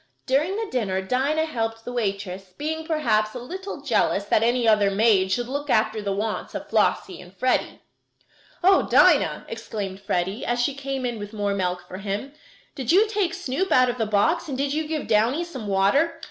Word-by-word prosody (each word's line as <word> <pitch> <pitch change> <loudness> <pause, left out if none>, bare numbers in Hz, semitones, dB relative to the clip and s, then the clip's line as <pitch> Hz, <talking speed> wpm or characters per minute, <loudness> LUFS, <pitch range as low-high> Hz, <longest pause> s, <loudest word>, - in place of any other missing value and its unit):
During 295 +8 +1
the 445 +1 -2
dinner, 200 -7 -1
Dinah 275 +9 +1
helped 225 -6 -3
the 245 - -5
waitress, 195 -4 -3
being 320 +2 -3
perhaps 220 -9 +1
a - - -4
little 365 +4 -7
jealous 215 -6 +1
that 210 - +2
any 240 +1 +2
other 210 -2 +4
maid 195 -2 +3
should 240 +4 0
look 285 +2 -4
after 220 -2 +2
the 200 -1 -2
wants 210 +2 -3
of - - -5
Flossie 375 -3 0
and 180 +2 -16
Freddie. 255 0 0 0.8
"Oh, 380 +1 +5
Dinah!" - - +4
exclaimed 210 -4 -6
Freddie, 190 +3 -2
as 240 0 -1
she 255 +4 +1
came 270 -1 -4
in 240 -3 -3
with 205 +1 -8
more 205 -1 -1
milk 180 -2 -2
for 185 - -8
him, 205 +8 -4 0.4
"did 260 -5 -2
you 405 +5 +5
take 400 -5 -1
Snoop 370 +1 -2
out 255 -1 +5
of 245 - -10
the 225 - 0
box 215 +13 +1
and 265 - -3
did 280 +1 -1
you 310 0 -1
give 310 -2 -3
Downy 230 +9 +2
some 265 -11 -7
water?" 200 +12 +2
240 Hz, 195 wpm, -24 LUFS, 205-290 Hz, 0.8 s, Oh